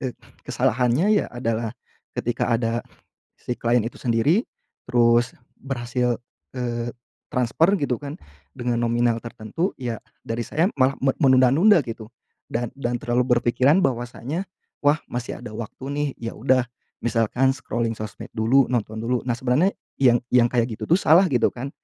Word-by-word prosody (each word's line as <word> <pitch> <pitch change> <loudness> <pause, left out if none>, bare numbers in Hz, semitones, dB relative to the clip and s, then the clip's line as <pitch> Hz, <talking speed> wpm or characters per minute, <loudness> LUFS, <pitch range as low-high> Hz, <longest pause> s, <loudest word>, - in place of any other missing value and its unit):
eee, 130 -2 -4 0.3
kesalahannya 125 - +2
ya - - -4
adalah, 115 -1 -3 0.4
ketika 120 - -1
ada 115 0 +1 0.6
si 120 - -4
klien 120 0 +2
itu 115 - -6
sendiri, 130 - +2 0.4
terus 120 0 +3 0.2
berhasil, 125 -2 -2 0.3
eee, 120 -1 -3 0.4
transfer 135 - +2
gitu 125 -4 0
kan, 145 0 -7 0.4
dengan 120 -1 -2
nominal 120 0 +2
tertentu, 115 - -3
ya 120 -4 -3 0.2
dari 115 +1 -3
saya 165 +5 +1
malah 130 +1 +4
me 135 -1 +3
menunda-nunda 140 - +5
gitu. 115 -1 -7 0.4
Dan 120 0 -3
dan 120 -3 -2
terlalu 120 +1 +1
berpikiran 125 +7 +3
bahwasanya, 130 +8 -3 0.3
wah 145 +1 +4
masih 120 0 -5
ada 120 -3 -9
waktu 115 +4 -7
nih, 145 0 0
ya 115 0 -5
udah, 130 +1 +2 0.4
misalkan 120 +3 +2
scrolling 115 -4 -2
sosmed 105 -2 -8
dulu, 120 +4 +4
nonton 110 -3 -1
dulu. 120 +2 -1
Nah 120 - 0
sebenarnya, 130 +9 +2 0.3
yang 120 -2 +6 0.2
yang 120 -1 +5
kayak 120 -2 0
gitu - - -6
tuh 170 - +6
salah 170 +4 +5
gitu 125 -4 +2
kan. 130 +3 -5
120 Hz, 150 wpm, -23 LUFS, 115-135 Hz, 0.6 s, yang